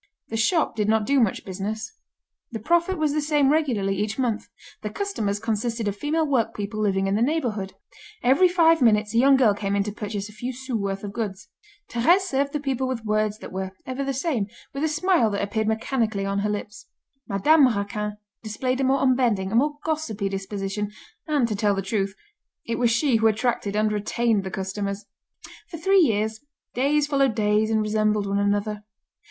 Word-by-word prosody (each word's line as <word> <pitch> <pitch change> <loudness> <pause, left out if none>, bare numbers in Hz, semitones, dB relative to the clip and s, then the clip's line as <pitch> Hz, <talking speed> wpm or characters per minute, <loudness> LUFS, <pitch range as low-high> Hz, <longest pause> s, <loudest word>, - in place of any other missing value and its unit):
The 225 - -4
shop 305 +9 +1
did 210 -1 0
not 220 -1 +2
do 280 +3 +3
much 225 -6 +1
business. 205 - -4 0.6
The 230 - -3
profit 345 - +1
was 305 -2 +1
the 305 - +1
same 290 -2 +2
regularly 235 -11 +1
each 210 +2 -2
month. 245 -5 -1 0.3
The 210 - -3
customers 210 - -2
consisted 225 +1 -2
of 200 - -1
female 310 +8 0
workpeople 220 -6 -1
living 195 -2 +1
in 195 - 0
the 210 - +1
neighbourhood. 235 -9 -1 0.5
Every 275 +9 +5
five 330 -3 +4
minutes 210 -2 +3
a 230 - +3
young 270 +2 +6
girl 245 -6 +4
came 200 -1 -2
in 200 - +2
to 210 - -4
purchase 205 -1 -5
a - - -12
few 245 +4 -5
sous 260 0 -5
worth 195 -2 -2
of 200 -1 -6
goods. 190 -5 -5 0.4
Thérèse 330 +11 +3
served 280 -6 -1
the 295 - -2
people 265 -2 -1
with 240 -3 -4
words 215 0 0
that - - -10
were 190 0 -4
ever 260 +2 -3
the 275 - -1
same, 260 - -1 0.3
with 275 +2 -3
a - - +3
smile 320 - +2
that 200 -1 -2
appeared 215 +2 -1
mechanically 220 -2 -1
on 195 0 -1
her 210 +1 0
lips. 210 0 -5 0.4
Madame 275 +8 +5
Raquin 210 -1 -2 0.2
displayed 255 +4 -2
a - - +1
more 265 +1 +2
unbending, 240 -7 +2
a - - -1
more 290 +4 +2
gossipy 240 -11 -2
disposition, 195 +1 -4 0.4
and, 290 -6 +2
to 215 - -2
tell 205 0 +1
the 195 - -2
truth, 195 0 -1 0.5
it 230 - -2
was 240 -1 +3
she 230 +1 +2
who 225 0 +3
attracted 220 -2 0
and 215 0 +2
retained 210 0 0
the 190 - -4
customers. 200 +2 -4 0.6
For 330 - -7
three 390 +4 +4
years, 220 -5 +1 0.3
days 285 +4 +2
followed 275 -5 +1
days 215 0 +2
and 220 -1 +2
resembled 215 -1 +1
one 200 0 0
another. 205 +1 0
220 Hz, 195 wpm, -24 LUFS, 205-270 Hz, 0.6 s, young